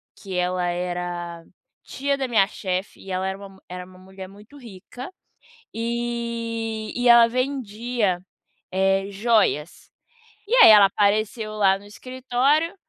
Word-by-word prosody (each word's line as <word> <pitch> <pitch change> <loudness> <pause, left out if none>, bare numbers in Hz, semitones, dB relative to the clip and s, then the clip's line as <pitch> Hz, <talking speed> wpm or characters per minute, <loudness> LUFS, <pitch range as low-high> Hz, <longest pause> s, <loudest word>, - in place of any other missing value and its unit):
que 190 -3 -8
ela 180 0 0
era 175 -1 -4 0.4
tia 280 +1 -2
da 265 -1 -2
minha 220 -5 +3
chefe, 190 -1 -4
e 195 - -12
ela 185 +1 -1
era 190 0 -4
uma 200 -1 -11
mu 190 0 -18
era 180 0 -7
uma 185 0 -17
mulher 190 0 -11
muito 210 +8 -16
rica, 245 - -10 0.6
e 230 -1 -3
e 245 0 0
ela 235 -1 +8
vendia, 240 -6 -2 0.5
eh, 195 +1 +1
joias. 200 -7 0 0.6
E 460 - 0
aí 460 - +9
ela 205 -2 +8
apareceu 215 +2 0
lá 195 -2 +3
no 200 - -17
escritório 260 - -1
210 Hz, 140 wpm, -23 LUFS, 190-240 Hz, 0.6 s, aí